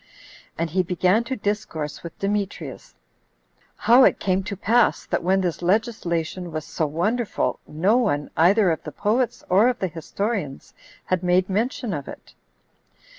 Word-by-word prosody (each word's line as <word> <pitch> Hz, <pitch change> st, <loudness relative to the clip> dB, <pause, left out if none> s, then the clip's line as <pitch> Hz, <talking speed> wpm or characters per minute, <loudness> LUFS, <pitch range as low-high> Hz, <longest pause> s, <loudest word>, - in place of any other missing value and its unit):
And 165 Hz, -1 st, -2 dB
he 185 Hz, +3 st, +2 dB
began 180 Hz, +5 st, +2 dB
to 260 Hz, -, -3 dB
discourse 205 Hz, -, -3 dB
with 170 Hz, -, -9 dB
Demetrius, 200 Hz, 0 st, -4 dB, 0.8 s
"How 245 Hz, +3 st, +5 dB
it -, -, +4 dB
came 190 Hz, 0 st, +1 dB
to 200 Hz, -1 st, -5 dB
pass, 230 Hz, +3 st, +2 dB
that -, -, -1 dB
when 190 Hz, +2 st, +2 dB
this 175 Hz, -3 st, -2 dB
legislation 180 Hz, -4 st, -1 dB
was 155 Hz, -1 st, -4 dB
so 160 Hz, -, -2 dB
wonderful, 210 Hz, +10 st, -1 dB
no 185 Hz, +10 st, +2 dB
one, 150 Hz, -13 st, 0 dB
either 185 Hz, +4 st, +4 dB
of 160 Hz, -, -2 dB
the 150 Hz, -, -8 dB
poets 225 Hz, -, 0 dB
or 200 Hz, +6 st, +5 dB
of 250 Hz, -1 st, +1 dB
the 190 Hz, -, -1 dB
historians, 170 Hz, -1 st, -4 dB, 0.3 s
had 185 Hz, -1 st, 0 dB
made 180 Hz, +1 st, +2 dB
mention 230 Hz, +1 st, -1 dB
of 145 Hz, -3 st, -5 dB
it." -, -, -11 dB
190 Hz, 155 wpm, -23 LUFS, 170-215 Hz, 0.8 s, How